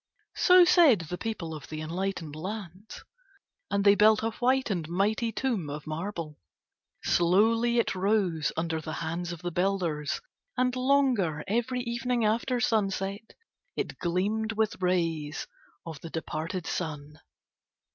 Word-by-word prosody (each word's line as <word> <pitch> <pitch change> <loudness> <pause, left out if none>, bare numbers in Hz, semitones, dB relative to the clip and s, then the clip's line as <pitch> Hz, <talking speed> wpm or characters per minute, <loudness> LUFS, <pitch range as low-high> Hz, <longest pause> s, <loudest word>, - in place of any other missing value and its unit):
So 360 -1 +7
said 325 - +6
the 165 +2 -5
people 185 -8 -4
of 150 -4 -8
the 155 - -6
enlightened 165 -1 -3
lands. 190 +3 -7 0.7
And 200 0 +1
they 200 - +8
built 215 +2 +5
a 225 - 0
white 255 +1 +1
and 165 -5 -2
mighty 215 +6 +1
tomb 220 - -2
of 145 +1 -6
marble. 160 -1 -5 0.6
Slowly 225 +7 +3
it 235 - +2
rose 190 -5 +1
under 160 -1 -1
the 155 0 -6
hands 170 +2 -3
of 175 0 -8
the 175 - -2
builders 175 -4 -1 0.4
and 250 0 +1
longer 255 - +2
every 240 +4 0
evening 235 0 -1
after 235 +4 +1
sunset 200 -2 -1 0.4
it - - -4
gleamed 205 +5 0
with 215 -3 -1
rays 165 -5 0 0.4
of 160 -3 -7
the 165 - -7
departed 165 +3 -4
sun. 150 -3 -4
195 Hz, 135 wpm, -28 LUFS, 165-225 Hz, 0.7 s, they